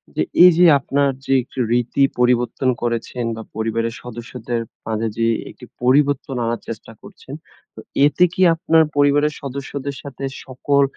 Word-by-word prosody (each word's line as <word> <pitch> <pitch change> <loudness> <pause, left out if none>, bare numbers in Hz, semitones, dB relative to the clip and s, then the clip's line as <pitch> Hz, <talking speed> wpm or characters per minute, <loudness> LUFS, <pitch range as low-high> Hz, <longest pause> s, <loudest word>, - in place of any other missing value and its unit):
যে - - 0 0.2
এইযে 180 0 +6
আপনার 140 +1 0 0.2
যে - - +1
একটি 130 +1 -10
রীতি 120 +3 +1 0.2
পরিবর্তন 125 +1 +1
করেছেন 120 +1 -3
বা, 110 - -7
পরিবারের 115 +1 -2
সদস্যদের 120 0 -5 0.2
মাঝে 110 0 -2
যে 115 - +1 0.2
একটি - - -13 0.2
পরিবর্তন 135 +1 +2
আনার 115 0 -2
চেষ্টা 115 0 -8
করছেন, 195 -9 -13 0.4
তো - - -10 0.3
এতে 150 +4 +3
কি 185 - -3
আপনার 165 -1 +3
পরিবারের 145 +1 +3
সদস্যদের 140 0 -5
সাথে 140 -1 -9 0.2
সকল 140 +2 +1
130 Hz, 140 wpm, -20 LUFS, 120-145 Hz, 0.4 s, এইযে